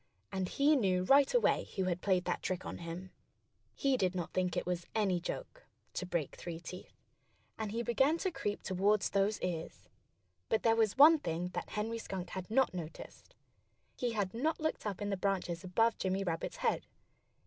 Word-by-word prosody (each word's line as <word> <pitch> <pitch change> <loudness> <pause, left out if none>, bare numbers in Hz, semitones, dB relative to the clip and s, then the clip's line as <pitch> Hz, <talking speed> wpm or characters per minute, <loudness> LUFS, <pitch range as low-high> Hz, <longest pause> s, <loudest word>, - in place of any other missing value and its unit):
And 190 -2 -2
he 290 +2 +4
knew 185 -8 +2
right 275 +7 +5
away - - +3
who 190 - +1
had 180 -1 -1
played 185 -2 +2
that 175 - -1
trick 185 0 -2
on - - -5
him. 175 +2 -7 0.6
He 275 -2 +2
did 185 -3 +1
not 175 -1 -3
think 180 -1 0
it - - -1
was 175 -1 -2
any 195 -5 +2
joke, - - -6 0.3
to 185 - -3
break 170 -6 -2
three 170 -2 -6
teeth. 180 +2 -10 0.6
And 215 -2 -2
he 230 +2 -1
began 265 +7 +3
to 375 +2 -1
creep 205 -10 -3
toward 200 +2 +2
those 200 +3 +1
ears. 170 -3 -4 0.6
But 220 - +1
there 225 -1 +5
was 225 0 +2
one 310 +3 +9
thing 175 - -2
that - - -5
Henry 225 +2 -2
Skunk 185 -5 -5
had 185 0 -5
not 260 +1 +3
noticed. 175 - -8 0.6
He 245 -2 -1
had 200 -4 -1
not 305 +8 0
looked 315 -8 -2
up 205 0 -3
in 205 - -2
the 195 - 0
branches 185 -3 -1
above 225 +5 +2
Jimmy 190 +1 0
Rabbit's 165 -3 -3
head. - - 0
195 Hz, 190 wpm, -33 LUFS, 180-230 Hz, 0.6 s, one